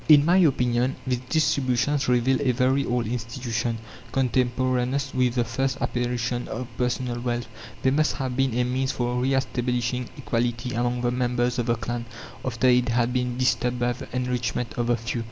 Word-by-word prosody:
(30) 155 - +9
In 145 - 0
my 175 +3 +5
opinion 125 -6 +2
these 125 -2 0
distributions 140 -2 +1
reveal 125 +2 +3
a 135 -3 +3
very 130 +3 +2
old 120 -1 0
institution, 115 0 -2 0.3
contemporaneous 130 +1 0
with 125 -1 +1
the 120 - +2
first 130 +3 -1
apparition 120 0 -1
of 125 +2 -5
personal 125 0 -1
wealth; 120 -1 -1 0.4
they 130 - +4
must 150 +2 +2
have 130 -2 -3
been 130 -2 +1
a 125 - +3
means 130 +2 0
for 125 0 -1
re 135 +1 +2
establishing 125 -1 -1
equality 120 -2 -1
among 120 +1 0
the 120 0 +1
members 125 0 0
of 120 - -1
the 120 - +3
clan, 120 +1 -4 0.4
after 130 0 0
it 125 0 +4
had 120 +1 +1
been 125 -1 -1
disturbed 125 -1 +1
by 120 0 +1
the 120 - -9
enrichment 125 -2 -2
of 120 -1 -1
the 120 -1 +2
few. 115 +1 -3
125 Hz, 180 wpm, -25 LUFS, 120-130 Hz, 0.4 s, 30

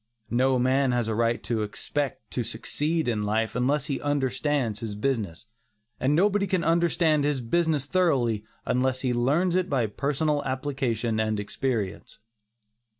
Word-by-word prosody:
No 130 +2 +3
man 130 +1 +2
has 120 -2 0
a 110 - 0
right 115 0 +1
to 110 +2 -1
expect 135 +6 -3
to 125 - -1
succeed 150 +7 -2
in 110 -3 0
life 110 +2 0
unless 135 +3 +1
he 140 -3 -3
understands 135 -4 0
his 110 -3 -5
business, 110 -5 -2 0.5
and 140 +3 +2
nobody 200 +3 +3
can 180 -2 0
understand 165 -2 +2
his 145 -2 +1
business 150 +3 +1
thoroughly 135 - +1 0.2
unless 130 0 +1
he 125 -2 0
learns 145 +10 +2
it 185 0 +1
by 130 -5 +1
personal 145 +6 0
application 130 -5 -1
and 110 -1 0
experience. 105 -1 -3
130 Hz, 150 wpm, -26 LUFS, 115-150 Hz, 0.5 s, No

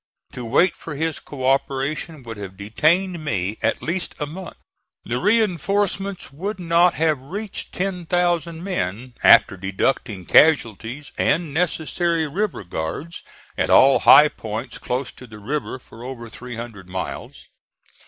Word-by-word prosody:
To 125 - -7
wait 145 +10 +3
for 165 - -8
his 160 +1 -2
co 130 -3 -7
operation 135 +3 -1
would 115 -2 -8
have 95 -2 -8
detained 160 - +1
me 105 -6 -2
at - - 0
least 175 +3 -2
a 150 - -1
month. 175 +5 -8 0.5
The 120 +1 -2
reinforcements 200 - 0
would 195 +7 -4
not 170 0 +3
have 155 -3 +1
reached 200 +9 -6
ten 180 -2 -3
thousand 175 -1 0
men 120 - -3
after - - +6
deducting 95 +1 -1
casualties 135 - +3
and 165 -4 +1
necessary 165 0 0
river 190 - -2
guards 90 - -5 0.3
at - - 0
all 135 +1 +6
high 150 +2 +8
points 110 0 -6
close 125 +2 -3
to 125 - -13
the 110 -2 -11
river 135 +6 -3
for 115 -2 -14
over 120 -3 -7
three 125 +1 -8
hundred 110 -6 -8
miles. 95 0 -6
145 Hz, 145 wpm, -22 LUFS, 115-175 Hz, 0.5 s, high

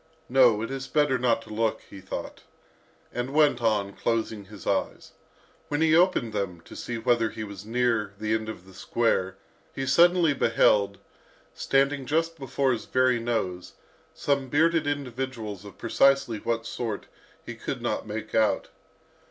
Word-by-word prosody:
"No, 125 -5 +5
it 115 - -4
is 135 -1 -5
better 145 -4 +2
not 120 -2 +1
to - - -10
look," 110 0 0
he 95 - -11
thought, 95 - -6 0.7
and 125 +3 -3
went 150 -5 +4
on, 105 -3 +1
closing 110 -2 -2
his 100 -1 -12
eyes. - - -2 0.6
When 145 0 -1
he 160 0 +4
opened 170 - +3
them, 100 -4 -3
to - - -13
see 120 - -4
whether 115 -1 +2
he 110 - -6
was 100 -1 -9
near 115 -4 0
the 110 +1 -1
end 110 0 -1
of 95 -5 -8
the 95 - -16
square, 95 -2 0 0.4
he 135 - -2
suddenly 170 +2 +5
beheld, 100 -5 +3 0.6
standing 135 0 +1
just 165 +2 0
before 135 0 0
his 115 -3 -2
very 130 -1 +2
nose, 95 -7 -3 0.4
some 140 -2 0
bearded 160 +1 +2
individuals 125 -7 -4
of 100 -2 -12
precisely 135 -5 +2
what 115 +1 -2
sort, 115 -3 -4 0.4
he - - -6
could - - -5
not - - -2
make 110 +1 -6
out. 110 -1 +2
115 Hz, 160 wpm, -26 LUFS, 105-135 Hz, 0.7 s, No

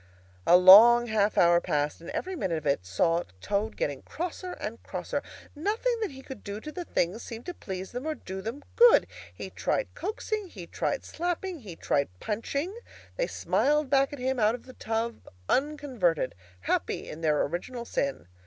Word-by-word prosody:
A 175 - +8
long 220 +7 +9
half 215 -2 +1
hour 170 0 +5
passed, 150 +1 -1
and 170 - -9
every 375 +1 -3
minute 185 - -1
of 155 - -7
it 140 -11 0
saw 165 - +2 0.2
Toad 205 - -2
getting 140 -2 -2
crosser 360 +2 -5
and - - -6
crosser. - - -4 0.3
Nothing 435 +10 0
that 430 - 0
he 265 -1 -11
could 265 - -9
do 200 0 -5
to 305 - -8
the 350 +3 -6
things 185 - 0
seemed 230 0 -8
to 355 - -4
please 190 - -6
them 250 +5 -5
or 310 - -1
do 190 -6 -7
them 235 +8 -6
good. 480 0 +7 0.3
He - - -8
tried - - -1
coaxing, 430 -1 -3
he 195 - -9
tried - - -2
slapping, 350 +1 -3
he 200 -9 -9
tried 140 -3 0
punching; 280 - -3 0.4
they - - 0
smiled 295 -1 +1
back 275 -1 +4
at 290 - -6
him 260 0 -1
out 215 +1 +3
of 245 - -12
the 255 - -12
tub 225 0 -3 0.2
unconverted, 260 - 0 0.3
happy - - -1
in 155 - -8
their 150 -2 +2
original 235 - -4
sin. 140 - -2
235 Hz, 180 wpm, -28 LUFS, -, 0.4 s, long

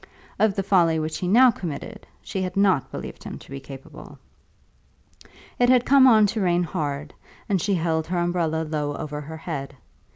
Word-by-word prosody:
Of 215 -3 +3
the 195 - -1
folly 175 -4 +3
which 155 0 -3
he 180 - -2
now 245 +6 +6
committed, 200 +3 -7 0.2
she 190 - -4
had 185 0 -4
not 190 -8 +2
believed - - -8
him - - -7
to - - -16
be 135 - -6
capable. 135 0 -12 1.4
It 245 0 +4
had 250 -1 +4
come 270 -1 +6
on 220 -4 +6
to 220 - -2
rain 175 -1 +2
hard, 150 -2 -4 0.3
and 195 -5 0
she 200 +1 +1
held 160 -2 -1
her 180 +1 -2
umbrella 170 -2 0
low 150 -2 -2
over 150 0 -5
her 160 +2 -8
head. 140 -4 -6
175 Hz, 185 wpm, -24 LUFS, 155-200 Hz, 1.4 s, now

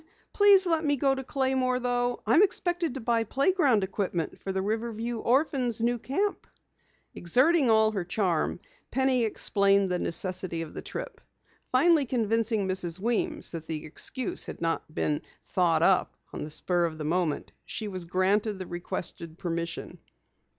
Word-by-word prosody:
Please 405 -2 +6
let 330 -2 +1
me 290 -1 +2
go 270 0 +2
to 265 0 -4
Claymore 260 -1 0
though. 245 0 -1
I'm 235 - +5
expected 350 -6 +1
to - - -3
buy 230 -1 +1
playground 275 - +2
equipment 185 -4 -3
for 195 - -3
the 190 0 -1
Riverview 225 +2 -3
Orphans' 250 -2 +1
new 240 +1 +1
camp." 395 - -2 0.7
Exerting 260 - +3
all 220 -1 +4
her 195 -4 -2
charm, 175 -3 -1 0.3
Penny 260 -1 +2
explained 200 -3 +2
the 180 - 0
necessity 175 -1 -1
for 155 - -9
the - - -7
trip. - - -7 0.5
Finally 290 +2 +4
convincing 225 -3 +1
Mrs. 185 -2 -1
Weems 310 - -1
that 160 -2 -7
the 155 -2 -4
excuse 240 - -2
had - - -8
not 165 -2 -2
been 150 -1 -1 0.2
"thought 165 -3 +2
up" 190 0 +2 0.2
on - - -5
the 150 - -6
spur 175 +3 0
of 160 -2 -4
the 155 - -5
moment, 170 -1 -1
she 215 - -5
was 185 -3 -4
granted 195 +4 +1
the 185 - -6
requested 170 -1 -6
permission. 170 -2 -4
220 Hz, 155 wpm, -28 LUFS, 180-260 Hz, 0.7 s, Please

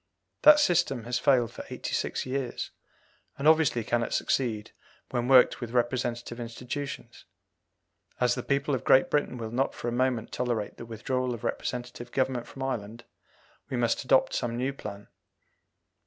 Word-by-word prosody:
That 300 0 +9
system 175 - +2
has 120 +1 -1
failed 125 -5 +3
for - - -8
eighty - - -5
six - - -1
years, 130 -1 -3 0.7
and 140 - 0
obviously 155 -7 +4
cannot 120 +1 0
succeed 115 -5 -1 0.4
when 120 -1 -1
worked 130 0 +6
with 120 - -4
representative 120 -1 -1
institutions. 125 +4 -6 0.9
As 125 -1 +3
the 125 - -3
people 140 +2 0
of 125 - -1
Great 130 - +5
Britain 145 -4 0
will 110 -2 -5
not 130 +3 0
for 120 - -3
a - - -3
moment 125 -2 0
tolerate 120 -4 -2
the 115 - -9
withdrawal 125 +2 -2
of 115 - -12
representative 120 0 -4
government 130 -2 -1
from 135 - -7
Ireland, 115 -3 -4 0.7
we 130 - -2
must 120 -1 +1
adopt 130 0 +3
some 120 -1 -1
new 130 +3 -1
plan. 100 -6 -8
125 Hz, 155 wpm, -28 LUFS, 120-135 Hz, 0.9 s, That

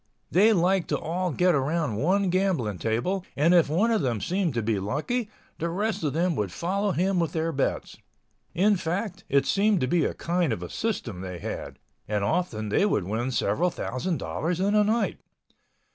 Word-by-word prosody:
They 205 +5 +5
liked 185 -1 +2
to - - 0
all 175 +3 -2
get 180 +3 +2
around 150 -2 0
one 185 - +2
gambling 170 - 0
table 145 - -1
and 160 +5 +4
if 170 -4 +5
one 200 +10 +2
of 220 - +2
them 120 -5 0
seemed 180 - -1
to 115 - 0
be 105 -2 0
lucky, 155 - -2 0.3
the 170 - -1
rest 205 +3 -2
of 145 -3 0
them 170 +1 +1
would 100 -4 -1
follow 195 - -1
him 185 +1 +1
with 165 -2 -1
their 165 0 0
bets. 140 -3 -2 0.6
In 200 +3 +4
fact, 180 +3 -3
it 140 0 +3
seemed 205 -1 +2
to 130 - +1
be 170 +5 +2
a - - -2
kind 170 -4 0
of 90 - -5
a 90 - -7
system 125 - -3
they 90 -1 -6
had—and 105 +4 -6
often 110 - -1
they 105 - +2
would 105 - +1
win 110 +7 -2
several 125 - +1
thousand 165 +2 -3
dollars 170 +2 -2
in 200 +2 +1
a 210 0 +5
night. 220 +3 0
170 Hz, 190 wpm, -26 LUFS, 125-190 Hz, 0.6 s, They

